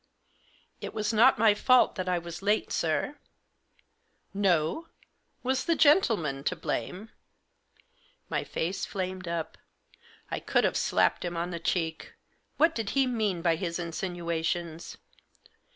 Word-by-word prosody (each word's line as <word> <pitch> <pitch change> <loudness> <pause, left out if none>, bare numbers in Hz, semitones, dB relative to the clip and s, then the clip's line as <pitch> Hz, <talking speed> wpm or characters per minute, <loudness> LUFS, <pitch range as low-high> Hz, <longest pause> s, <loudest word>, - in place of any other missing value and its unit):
" - - -35 0.4
It - - -6
was 215 +1 -1
not 235 +5 +6
my 220 -1 +5
fault 255 +4 +4
that 185 -1 -3
I 180 - +2
was 170 0 -7
late, 210 +2 +1
sir." - - -1 0.5
" - - -41 0.2
No? 170 - +1 0.6
Was 260 +1 0
the 335 - +2
gentleman 215 - +3
to 180 - 0
blame? 185 +5 -4 0.6
" 485 0 -35 0.3
My - - -1
face 180 +4 -3
flamed 185 -1 -4
up. 170 -1 -4 0.7
I - - -2
could - - +1
have - - +1
slapped - - +2
him 175 -1 -3
on 175 +2 -2
the 170 - -4
cheek. 160 -1 -2 0.4
What 325 +1 +4
did 225 -3 -3
he 270 - +5
mean 215 -8 -1
by 165 -2 +3
his 170 -1 -3
insinuations 170 -1 -3
180 Hz, 145 wpm, -28 LUFS, 170-220 Hz, 0.7 s, not